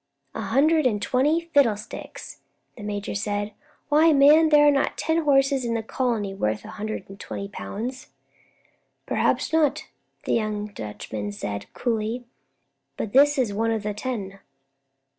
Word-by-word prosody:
"A -, -, -4 dB
hundred 275 Hz, +8 st, +3 dB
and 210 Hz, -4 st, 0 dB
twenty 275 Hz, +9 st, +2 dB
fiddlesticks," 225 Hz, -7 st, -1 dB, 0.4 s
the 230 Hz, -, -11 dB
major 205 Hz, -1 st, -4 dB
said. 205 Hz, 0 st, -2 dB, 0.4 s
"Why, 310 Hz, +2 st, +5 dB
man, 300 Hz, +3 st, +6 dB
there 295 Hz, -1 st, +6 dB
are -, -, +7 dB
not 275 Hz, -, 0 dB
ten 320 Hz, 0 st, 0 dB
horses 275 Hz, -1 st, +3 dB
in 235 Hz, -1 st, -1 dB
the 225 Hz, -, -2 dB
colony 225 Hz, -4 st, -1 dB
worth 110 Hz, -, -2 dB
a -, -, -9 dB
hundred 215 Hz, -2 st, -5 dB
and 195 Hz, +1 st, -12 dB
twenty 200 Hz, -, -6 dB
pounds." 235 Hz, +5 st, -6 dB, 1.0 s
"Perhaps -, -, 0 dB
not," 310 Hz, -1 st, +2 dB, 0.4 s
the -, -, -1 dB
young 215 Hz, -2 st, -1 dB
Dutchman 105 Hz, -, -6 dB
said, 100 Hz, 0 st, -6 dB
coolly, 230 Hz, +1 st, -2 dB, 0.7 s
"but 210 Hz, -, -4 dB
this 290 Hz, +2 st, +5 dB
is 240 Hz, -6 st, +1 dB
one 225 Hz, +3 st, 0 dB
of 220 Hz, -2 st, -1 dB
the 210 Hz, 0 st, -2 dB
ten." 205 Hz, -4 st, -5 dB
225 Hz, 150 wpm, -24 LUFS, 205-280 Hz, 1.0 s, are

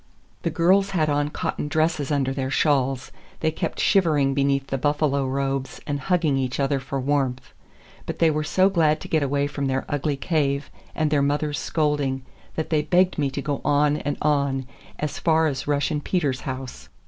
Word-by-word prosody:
The -, -, 0 dB
girls 190 Hz, +4 st, +3 dB
had 155 Hz, -2 st, +2 dB
on 145 Hz, 0 st, +1 dB
cotton 150 Hz, -, -3 dB
dresses 155 Hz, -1 st, 0 dB
under 135 Hz, -2 st, +1 dB
their 135 Hz, -1 st, -2 dB
shawls; 135 Hz, -2 st, +1 dB, 0.3 s
they 160 Hz, -, +2 dB
kept -, -, -4 dB
shivering 155 Hz, -8 st, +3 dB
beneath 140 Hz, 0 st, +1 dB
the 135 Hz, -1 st, -3 dB
buffalo 145 Hz, -1 st, +1 dB
robes 135 Hz, 0 st, -2 dB
and 145 Hz, -1 st, -2 dB
hugging 165 Hz, -3 st, +1 dB
each 130 Hz, 0 st, -2 dB
other 140 Hz, 0 st, +1 dB
for 135 Hz, +1 st, -4 dB
warmth. 135 Hz, -2 st, -1 dB, 0.5 s
But -, -, -4 dB
they 165 Hz, -1 st, +4 dB
were 155 Hz, 0 st, -1 dB
so 185 Hz, +5 st, +3 dB
glad 160 Hz, -5 st, +2 dB
to -, -, -7 dB
get 155 Hz, -, +1 dB
away 140 Hz, 0 st, +1 dB
from 140 Hz, -1 st, -2 dB
their 135 Hz, 0 st, -1 dB
ugly 145 Hz, 0 st, -1 dB
cave 140 Hz, -2 st, 0 dB, 0.2 s
and 155 Hz, -1 st, 0 dB
their 145 Hz, -2 st, +3 dB
mother's 145 Hz, +1 st, 0 dB
scolding 145 Hz, -4 st, 0 dB, 0.3 s
that 160 Hz, -, -3 dB
they 155 Hz, -2 st, +3 dB
begged 180 Hz, +3 st, +2 dB
me 140 Hz, -2 st, +1 dB
to 140 Hz, +1 st, -5 dB
go 145 Hz, -1 st, -2 dB
on 145 Hz, 0 st, +3 dB
and 145 Hz, -1 st, -3 dB
on, 140 Hz, -3 st, +1 dB, 0.3 s
as 150 Hz, -1 st, -3 dB
far 160 Hz, -1 st, +3 dB
as 140 Hz, -3 st, -2 dB
Russian 145 Hz, +1 st, 0 dB
Peter's 145 Hz, -7 st, -1 dB
house. 130 Hz, -1 st, -6 dB
145 Hz, 185 wpm, -24 LUFS, 135-155 Hz, 0.5 s, they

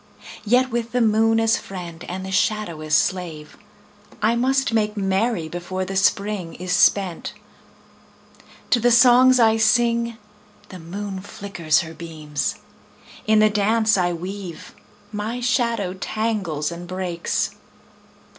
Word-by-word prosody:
Yet 250 Hz, +4 st, +3 dB
with 235 Hz, 0 st, -3 dB
the 250 Hz, -, +2 dB
moon 225 Hz, 0 st, +3 dB
as 225 Hz, 0 st, +3 dB
friend 175 Hz, -3 st, -8 dB
and 185 Hz, +1 st, -6 dB
the 190 Hz, -, -6 dB
shadow 200 Hz, -4 st, 0 dB
as 155 Hz, 0 st, +1 dB
slave 165 Hz, -5 st, -1 dB, 0.6 s
I 220 Hz, +2 st, +2 dB
must 265 Hz, +1 st, +1 dB
make 210 Hz, -1 st, 0 dB
merry 195 Hz, -2 st, 0 dB
before 175 Hz, +3 st, -4 dB
the 195 Hz, -, -5 dB
Spring 200 Hz, -2 st, 0 dB
is 180 Hz, +1 st, -6 dB
spent. 180 Hz, 0 st, +2 dB, 1.4 s
To 245 Hz, -, +4 dB
the 240 Hz, +2 st, +3 dB
songs 250 Hz, +1 st, +6 dB
I 225 Hz, -1 st, +4 dB
sing 235 Hz, +1 st, +2 dB, 0.5 s
the 185 Hz, -, -9 dB
moon 190 Hz, +4 st, -6 dB
flickers 195 Hz, -5 st, -1 dB
her 160 Hz, -1 st, -8 dB
beams; 155 Hz, -2 st, -4 dB, 0.7 s
In 215 Hz, 0 st, +4 dB
the 215 Hz, 0 st, +5 dB
dance 215 Hz, +2 st, +2 dB
I 180 Hz, -2 st, +1 dB
weave 180 Hz, +1 st, -7 dB, 0.4 s
my 220 Hz, +3 st, -4 dB
shadow 235 Hz, -6 st, 0 dB
tangles 190 Hz, -7 st, -2 dB
and 175 Hz, +1 st, -8 dB
breaks. 185 Hz, -2 st, -2 dB
200 Hz, 130 wpm, -22 LUFS, 175-225 Hz, 1.4 s, songs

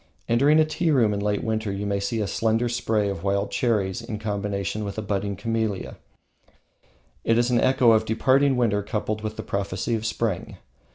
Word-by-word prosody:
Entering 140 Hz, +7 st, +4 dB
a 155 Hz, -, +5 dB
tea 160 Hz, +2 st, -1 dB
room 120 Hz, -8 st, +3 dB
in 100 Hz, -, -2 dB
late 105 Hz, 0 st, -1 dB
winter, 110 Hz, -2 st, -1 dB
you 100 Hz, +1 st, -3 dB
may 100 Hz, 0 st, 0 dB
see 105 Hz, +3 st, -2 dB
a -, -, 0 dB
slender 115 Hz, +4 st, 0 dB
spray 115 Hz, -3 st, 0 dB
of 100 Hz, -4 st, -4 dB
wild 100 Hz, 0 st, 0 dB
cherries 110 Hz, -3 st, 0 dB
in 115 Hz, -2 st, -5 dB
combination 105 Hz, -1 st, -3 dB
with 100 Hz, 0 st, -5 dB
a -, -, -1 dB
budding 100 Hz, 0 st, -2 dB
camellia; 110 Hz, -1 st, -2 dB, 1.3 s
it 115 Hz, -, +2 dB
is 120 Hz, +1 st, +2 dB
an 120 Hz, -, +3 dB
echo 130 Hz, -2 st, +4 dB
of 110 Hz, 0 st, +3 dB
departing 130 Hz, +4 st, +3 dB
winter 105 Hz, -4 st, +2 dB
coupled 105 Hz, +1 st, -3 dB
with 110 Hz, 0 st, -4 dB
the -, -, -4 dB
prophecy 100 Hz, +4 st, -2 dB
of 110 Hz, -1 st, -1 dB
spring. 110 Hz, -3 st, -2 dB
110 Hz, 190 wpm, -24 LUFS, 100-120 Hz, 1.3 s, a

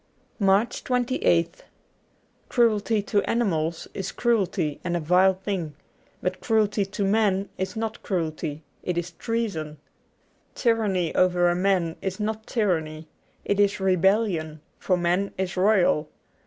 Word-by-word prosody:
93 200 Hz, -, 0 dB
MARCH 200 Hz, +5 st, +2 dB
28th 245 Hz, -10 st, +1 dB, 0.9 s
CRUELTY 220 Hz, -2 st, +2 dB
to 205 Hz, 0 st, +1 dB
animals 170 Hz, -8 st, 0 dB
is 195 Hz, -1 st, -4 dB
cruelty 195 Hz, -10 st, 0 dB
and 175 Hz, -1 st, -1 dB
a -, -, -2 dB
vile 180 Hz, +4 st, +4 dB
thing; 185 Hz, -6 st, -4 dB, 0.5 s
but -, -, -2 dB
cruelty 215 Hz, -3 st, +2 dB
to 200 Hz, +1 st, -4 dB
a -, -, +2 dB
man 200 Hz, -1 st, +2 dB
is 190 Hz, +5 st, -3 dB
not 225 Hz, 0 st, -4 dB
cruelty; 160 Hz, -4 st, -3 dB, 0.2 s
it 180 Hz, -1 st, -3 dB
is 175 Hz, +1 st, -2 dB
treason. 170 Hz, -7 st, -3 dB, 0.8 s
Tyranny 210 Hz, -8 st, +1 dB
over 180 Hz, -1 st, +3 dB
a 175 Hz, -, +1 dB
man 180 Hz, -3 st, +1 dB
is 190 Hz, +1 st, -3 dB
not 220 Hz, +1 st, -3 dB
tyranny: 160 Hz, -8 st, -1 dB, 0.4 s
it 200 Hz, -, 0 dB
is 205 Hz, 0 st, +3 dB
rebellion, 185 Hz, -4 st, +1 dB, 0.2 s
for 185 Hz, -, +1 dB
man 180 Hz, +3 st, 0 dB
is 190 Hz, 0 st, -2 dB
royal. 185 Hz, -6 st, +3 dB
190 Hz, 135 wpm, -25 LUFS, 170-210 Hz, 0.9 s, vile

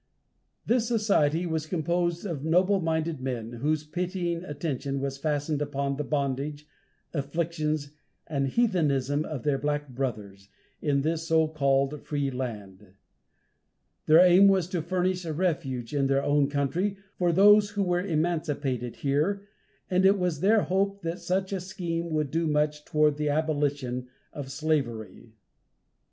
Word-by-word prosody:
This 235 Hz, -1 st, +2 dB
society 190 Hz, -8 st, +2 dB
was 160 Hz, -2 st, -2 dB
composed 170 Hz, +2 st, -1 dB
of 160 Hz, -8 st, -4 dB
noble 185 Hz, +5 st, +3 dB
minded 160 Hz, -3 st, -1 dB
men 120 Hz, -3 st, -4 dB
whose 145 Hz, +6 st, -1 dB
pitying 175 Hz, +1 st, -3 dB
attention 140 Hz, -4 st, -3 dB
was 135 Hz, 0 st, -3 dB
fastened 145 Hz, 0 st, -1 dB
upon 140 Hz, -1 st, -1 dB
the 150 Hz, -, -2 dB
bondage, 145 Hz, +1 st, -2 dB, 0.5 s
afflictions 155 Hz, 0 st, -2 dB, 0.3 s
and 140 Hz, -3 st, -1 dB
heathenism 150 Hz, -, +1 dB
of 150 Hz, -6 st, -5 dB
their 140 Hz, -2 st, +1 dB
black 145 Hz, +1 st, -2 dB
brothers, 105 Hz, -7 st, -5 dB, 0.3 s
in 140 Hz, -2 st, +1 dB
this 165 Hz, +1 st, -1 dB
so 160 Hz, -1 st, +3 dB
called 140 Hz, -1 st, +1 dB
free 145 Hz, -2 st, -2 dB
land. 105 Hz, -7 st, -6 dB, 1.1 s
Their 160 Hz, +2 st, +8 dB
aim 180 Hz, +2 st, +7 dB
was 190 Hz, -3 st, +3 dB
to 180 Hz, -3 st, -1 dB
furnish 180 Hz, +2 st, -1 dB
a 160 Hz, -2 st, -3 dB
refuge, 150 Hz, -8 st, -2 dB
in 140 Hz, -2 st, +2 dB
their 135 Hz, 0 st, +2 dB
own 145 Hz, -1 st, +2 dB
country, 160 Hz, +8 st, -1 dB, 0.2 s
for 175 Hz, -1 st, +3 dB
those 205 Hz, +3 st, +6 dB
who 205 Hz, -1 st, -1 dB
were 180 Hz, -1 st, +1 dB
emancipated 150 Hz, -, -1 dB
here, 155 Hz, +9 st, 0 dB, 0.4 s
and 185 Hz, 0 st, +2 dB
it 195 Hz, +1 st, +5 dB
was 180 Hz, -5 st, -1 dB
their 210 Hz, +4 st, +4 dB
hope 195 Hz, +1 st, 0 dB
that 170 Hz, +2 st, -3 dB
such 185 Hz, +3 st, -1 dB
a 190 Hz, -, -2 dB
scheme 170 Hz, -2 st, -4 dB
would 155 Hz, -3 st, -1 dB
do 165 Hz, 0 st, 0 dB
much 150 Hz, 0 st, 0 dB
toward 150 Hz, -1 st, +2 dB
the 150 Hz, 0 st, 0 dB
abolition 145 Hz, -5 st, -1 dB, 0.3 s
of 140 Hz, -2 st, -6 dB
slavery. 120 Hz, -7 st, -2 dB
155 Hz, 145 wpm, -27 LUFS, 140-175 Hz, 1.1 s, Their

